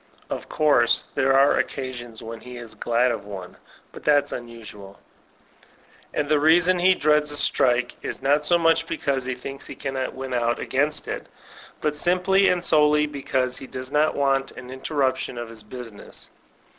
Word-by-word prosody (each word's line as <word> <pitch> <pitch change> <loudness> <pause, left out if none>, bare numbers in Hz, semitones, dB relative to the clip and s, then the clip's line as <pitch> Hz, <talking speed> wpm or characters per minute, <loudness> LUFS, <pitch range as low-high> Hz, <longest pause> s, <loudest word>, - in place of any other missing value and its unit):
(Of - - -5
course 140 -6 +3
there 135 0 +3
are 140 +1 +4
occasions 120 -4 -5
when 115 0 -8
he 125 0 -10
is 115 -2 -9
glad 120 +3 +1
of 115 - -4
one, 95 -3 -9 0.4
but - - -12
that's 145 -1 +3
unusual.) 110 -5 -9 1.1
And 145 - -1
the 150 0 +3
reason 175 +4 +4
he 185 +1 +5
dreads 150 -1 +2
a 145 - 0
strike 125 -3 +2
is - - -4
not 145 +3 +2
so 175 +3 +3
much 165 -1 +2
because 140 -5 -1
he 130 0 -2
thinks 135 +2 -8
he 140 - -8
cannot 130 -1 -4
win 130 -1 -5
out 120 -1 +1
against 145 +3 -1
it, - - -5 0.5
but 150 -1 0
simply 185 +4 +3
and 180 -1 0
solely 150 -1 +4
because 130 -3 -2
he 135 - -9
does 130 +1 -7
not 150 +1 +2
want 135 -1 +1
an 125 0 -10
in 130 0 -9
temiptk)n 130 -4 -1
of 120 -1 -6
his 115 -1 -8
business. 115 0 -11
135 Hz, 175 wpm, -24 LUFS, 120-150 Hz, 1.1 s, he